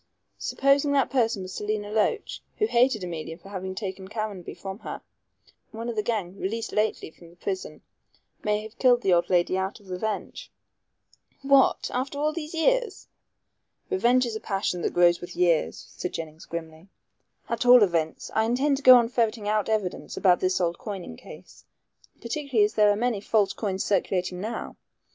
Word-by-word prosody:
Supposing 280 +1 +2
that 275 -2 +2
person 230 -6 +1
was 185 0 -8
Selina 210 +1 -3
Loach, 220 - 0 0.2
who 430 - +2
hated 240 - +2
Emilia 165 -2 -5
for 190 +3 -15
having 190 -1 -5
taken 190 -1 -5
Caranby 210 -4 -5
from 195 +1 -7
her. - - -7 0.7
One 230 +2 -6
of 235 - -4
the 215 - +1
gang 200 -4 -3
released 225 +4 -3
lately 215 -6 -1
from 170 +1 -17
prison 185 -3 -5 0.6
may 210 0 0
have 220 +2 -12
killed 245 -2 +4
the 190 - +3
old 170 0 +2
lady 180 +1 +2
out 190 +3 -3
of 195 -3 -14
revenge." 215 - -4 0.9
"What! 275 -1 +4
after 265 +3 -2
all 305 +2 0
these 320 0 -6
years?" - - 0 0.8
"Revenge 255 -9 +3
is 230 -2 -4
a - - -3
passion 195 -4 -2
that - - -2
grows 175 -1 +4
with 175 - -8
years," 170 -3 +1
said 180 - -4
Jennings 160 -1 -7
grimly; 165 +1 -7 0.6
"at 230 0 -2
all 245 -2 +8
events, 165 -4 -1
I 220 - +2
intend 270 +5 +1
to - - -7
go 255 0 +10
on 240 -2 +4
ferreting 230 -3 -1
out 215 0 0
evidence 210 -5 -2
about 180 -2 +4
this 185 0 +1
old 170 -1 -1
coining 195 - -6
case, - - -14 0.6
particularly 245 -3 +1
as 210 - -3
there 210 -1 +4
are 205 - +3
many 230 -2 -1
false 210 -2 +2
coins 195 -3 -2
circulating 180 -2 0
now. 220 +3 -5
210 Hz, 175 wpm, -26 LUFS, 185-240 Hz, 0.9 s, go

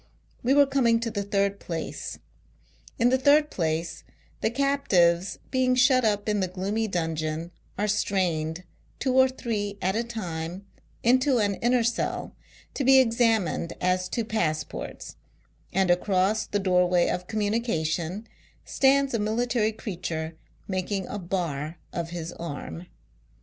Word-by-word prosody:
We 260 +3 +2
were 285 0 +7
coming 255 -4 +2
to 230 -1 -2
the 205 -2 -2
third 200 0 0
place. 165 -2 -5 0.8
In 235 +1 +4
the 260 +1 +2
third 295 +3 +4
place, 165 -1 -2 0.4
the - - +2
captives, 200 -10 +2
being 255 -1 +2
shut 255 0 +4
up 205 -2 +1
in 210 -1 +1
the 190 - +1
gloomy 195 +5 -2
dungeon, 160 -2 -2 0.3
are 210 +2 0
strained, 180 -5 0 0.3
two 260 -1 0
or 260 0 +6
three 210 -6 -3
at 190 +2 0
a 230 - +1
time, 180 -5 -5 0.4
into 255 +2 +4
an 205 -3 +2
inner 240 +3 +2
cell, 235 +1 -2 0.4
to 280 - -2
be 265 +1 +7
examined 225 - +2
as 185 0 0
to 230 - -2
passports; 165 -9 -3 0.5
and 190 -1 +2
across 190 +3 +1
the 205 - -1
doorway 180 -2 +3
of 180 0 -2
communication, 205 -4 -1 0.4
stands 275 0 +3
a 230 - +1
military 220 +1 +1
creature 170 -7 -5 0.3
making 190 0 -2
a 205 - -4
bar 170 -4 -3 0.2
of 170 -1 -3
his 170 -1 -5
arm. 135 - -7
200 Hz, 140 wpm, -26 LUFS, 175-235 Hz, 0.8 s, were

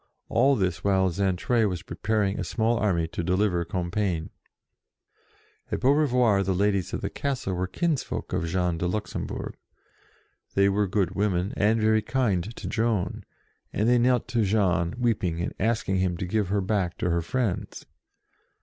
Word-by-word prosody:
All 135 +4 +4
this 90 -6 -1
while 95 -1 +3
Xaintrailles 100 +5 +1
was 90 -3 -4
preparing 100 -2 -1
a - - -1
small 115 +1 0
army 85 -7 +1
to 85 - -4
deliver 90 0 +1
Compiegne. 90 -1 -2 1.4
At - - -1
Beaurevoir 125 -7 +3
the 95 0 0
ladies 100 -2 +1
of - - -3
the - - -2
castle 135 -9 -2
were 90 +1 -1
CAPTIVITY 170 - -2
95 - - +3 0.4
kinsfolk - - -10
of - - 0
Jean 90 0 0
de 90 - 0
Luxembourg. 105 +3 -4 1.0
They 100 0 +4
were 100 +1 +1
good 95 -2 0
women, 95 -1 0
and 110 +2 +2
very 110 0 +3
kind 120 -7 0
to - - -7
Joan, 110 -6 -1 0.5
and 105 - 0
they 120 0 +4
knelt 125 0 +2
to 115 -3 +1
Jean, 95 -4 +1
weeping, 100 -9 0
and 85 - -2
asking 110 -4 0
him 90 -2 0
to 90 - -3
give 105 +2 0
her 100 +2 0
back 95 -3 -1
to 90 - 0
her 85 0 +1
friends. 105 +2 -2
100 Hz, 165 wpm, -26 LUFS, 90-110 Hz, 1.4 s, All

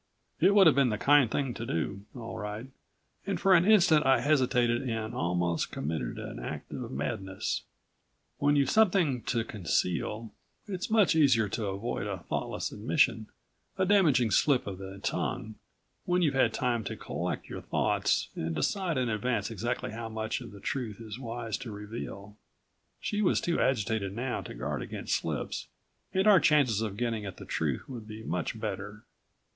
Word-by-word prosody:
It 200 - +5
would 200 -2 +8
have 160 - +7
been 135 -2 +4
the 105 - -1
kind 140 0 +5
thing 135 0 -1
to 115 - -6
do, 100 0 -3
all 115 -2 -6
right 105 +3 -5 0.6
and 195 -4 -1
for 195 +1 +5
an 175 -1 +6
instant 170 -8 +6
I 135 0 +4
hesitated 125 -5 +2
and 115 0 -3
almost 85 -4 0
committed 80 +2 -3
an - - -6
act - - -6
of - - -5
madness. 95 +7 -3 0.8
When 145 +1 +3
you've 140 -1 +3
something 180 - +3
to 115 -2 0
conceal, 105 +2 -1 0.3
it's 190 -2 -4
much 215 -6 +4
easier 130 -8 +4
to 110 0 -2
avoid 100 +1 -3
a 100 -2 -3
thoughtless - - -2
admission, 110 -1 +1 0.5
a 190 - +2
damaging 160 - +4
slip 135 +6 +3
of 95 -2 -6
the 95 0 -8
tongue, 110 +2 -2 0.5
when 180 0 +2
you've 150 -4 +2
had 135 - +3
time 120 -3 0
to - - -4
collect - - -4
your - - -6
thoughts - - +1
and 80 0 -3
decide 170 - 0
in 125 -1 +1
advance 110 -1 -1
exactly 120 +3 -2
how 115 0 -5
much 110 +2 -3
of 120 - -9
the 100 - -11
truth 110 -1 -3
it's 110 +1 -7
wise 115 -4 -4
to 125 - -7
reveal. 105 -1 -7 0.6
She 210 0 -1
was 195 - +3
too 170 - 0
agitated 105 -5 0
now 125 +2 -2
to - - -8
guard - - -3
against - - -4
slips - - -2 0.4
and 190 +1 +1
our 205 -3 +8
chances 140 - +3
of 105 -3 -3
getting 115 -2 -1
at 100 -2 -7
the - - -9
truth 75 -5 -2
would 120 -5 -8
be 110 0 -8
much 90 +3 -3
better. 105 0 -5
115 Hz, 175 wpm, -29 LUFS, 105-140 Hz, 0.8 s, would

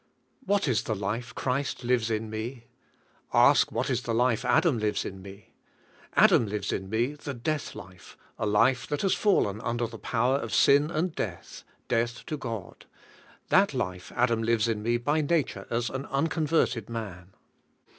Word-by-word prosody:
What 200 -6 +1
is 120 -4 +2
the 110 - -1
life 110 +4 -4
Christ 130 0 -2
lives 120 -2 +1
in 110 0 -1
me? 115 +3 -5 0.7
Ask - - +5
what - - -1
is 125 -2 0
the 115 -2 -2
life 120 -1 +2
Adam 150 -10 +3
lives 105 -1 -1
in 95 0 -7
me? 100 +1 -13 0.6
Adam 115 - +5
lives 105 0 -3
in 95 0 -4
me 120 +6 0
the 145 -2 -7
death 145 +5 -3
life, 90 0 -12 0.2
a 110 - 0
life 115 +5 +3
that 145 - -2
has 195 - +3
fallen 110 - +1
under 120 0 -1
the 115 -1 -8
power 125 +4 +1
of 115 -5 -3
sin 145 +5 +5
and 170 +1 -1
death, - - -6 0.2
death 120 0 -1
to 155 - -3
God. 115 -8 -7 0.6
That 195 -6 +4
life 90 -7 -4
Adam 120 -2 +2
lives 115 -1 +2
in 110 -2 -1
me 120 +2 +1
by 145 +6 0
nature 155 -1 -1
as 115 -1 -1
an 135 +2 -5
unconverted 150 - 0
man. 95 -5 -7
120 Hz, 170 wpm, -27 LUFS, 110-140 Hz, 0.7 s, Ask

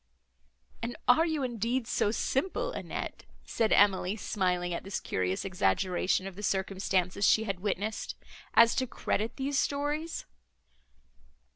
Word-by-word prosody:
"And 235 +1 -3
are 320 +7 +5
you, 310 -4 -1
indeed, 240 0 -1
so 205 - +1
simple, 375 - -1
Annette," - - -5 0.2
said 225 -1 0
Emily, 195 -1 +4
smiling 180 -4 -1
at 170 - -4
this 195 0 -3
curious 95 - -2
exaggeration 185 - +1
of 195 -2 -7
the 205 - -8
circumstances 190 -1 0
she 220 - +5
had 195 -4 -3
witnessed, 205 +2 -2 0.4
"as 230 0 +7
to 260 - +1
credit 225 -1 -2
these 275 +1 0
stories?" 295 +3 -2
210 Hz, 130 wpm, -30 LUFS, 190-260 Hz, 0.4 s, as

